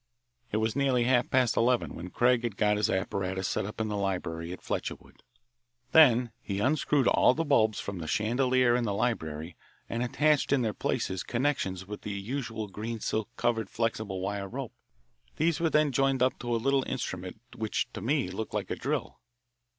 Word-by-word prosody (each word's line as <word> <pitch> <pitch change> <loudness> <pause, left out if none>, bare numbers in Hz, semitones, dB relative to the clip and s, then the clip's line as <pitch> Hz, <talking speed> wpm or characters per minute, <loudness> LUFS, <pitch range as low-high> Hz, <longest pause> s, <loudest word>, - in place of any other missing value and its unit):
It 105 - 0
was 110 0 0
nearly 135 -3 +2
half 120 0 +2
past 125 -3 +3
eleven 120 +1 +2
when 90 +2 -7
Craig 120 +4 +3
had 115 -4 -3
got 105 -1 +3
his 105 - +1
apparatus 95 0 -1
set 95 - -1
up 105 - -8
in 110 - 0
the 105 - -2
library 90 -4 -2
at 90 - -8
Fletcherwood. - - -5 0.7
Then 125 -6 +6
he 100 -1 -3
unscrewed 140 +2 +2
all 125 - +5
the 165 - -1
bulbs 110 -7 +3
from 100 -2 -5
the 80 - -5
chandelier 125 - +2
in 125 - +1
the 105 -3 -1
library 80 -8 -2 0.3
and 115 - -3
attached 145 +4 +2
in 140 -3 +3
their 110 -2 0
places 95 -1 -2
connections 120 -8 -1
with 105 +2 -7
the - - -6
usual 110 +1 -4
green 110 +3 -5
silk 110 0 -2
covered 115 -2 0
flexible 110 -4 -2
wire 100 +1 -3
rope. 130 +1 -5 0.6
These 160 +1 +1
were 165 -1 +2
then 150 -2 +3
joined 135 -1 +2
up 130 - +1
to 120 -1 -1
a - - +2
little 135 +4 +2
instrument 95 -6 -4 0.2
which 110 -2 -1
to - - -6
me 130 -1 0
looked 110 +4 -5
like - - -2
a - - 0
drill. - - -3
115 Hz, 190 wpm, -29 LUFS, 100-130 Hz, 0.7 s, Then